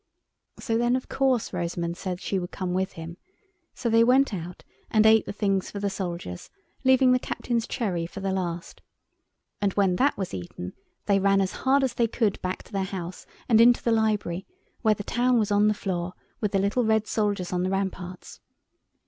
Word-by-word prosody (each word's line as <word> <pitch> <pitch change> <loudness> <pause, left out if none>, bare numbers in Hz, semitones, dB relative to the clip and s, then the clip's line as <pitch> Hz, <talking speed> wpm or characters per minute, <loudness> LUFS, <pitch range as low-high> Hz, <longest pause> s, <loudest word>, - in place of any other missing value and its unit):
So 225 -3 -1
then 240 +1 +2
of 255 - -3
course 260 -6 +1
Rosamund 170 -1 -2
said 180 0 -4
she 195 0 -1
would 175 -1 -5
come 185 -2 -3
with 190 +1 -1
him, 165 +1 -8 0.6
so 250 - -3
they 230 0 +5
went 255 +1 +4
out 175 -1 -6 0.3
and 215 -1 +4
ate 220 -1 +5
the - - -3
things 195 -2 0
for 200 - -6
the 200 0 -1
soldiers, 170 - -5 0.3
leaving 260 -1 +5
the 255 - +4
Captain's 235 -2 -2
cherry 180 -9 -2
for 195 - -9
the 195 0 -1
last. 175 -3 -4 0.8
And 200 -2 +1
when 190 -3 +2
that 280 +3 +2
was 190 -3 -4
eaten 90 0 -6 0.3
they 200 -1 +3
ran 195 0 +3
as 190 -1 +1
hard 270 +1 +2
as 260 - 0
they 235 - +2
could 220 -3 0
back 185 0 -3
to - - -19
their 195 -2 -1
house 185 -2 -6 0.2
and 225 -1 +6
into 240 +1 +5
the 235 - +2
library, 210 -5 0 0.3
where 220 -2 +3
the 205 - -6
town 245 +3 +2
was 215 -2 +1
on 205 +1 +4
the 210 - +2
floor, 180 -3 -3 0.3
with 210 -3 -1
the - - +4
little 200 +6 +1
red 220 -1 +2
soldiers 205 -5 -1
on 180 - 0
the 185 - 0
ramparts. 190 -2 -4
200 Hz, 200 wpm, -26 LUFS, 180-230 Hz, 0.8 s, and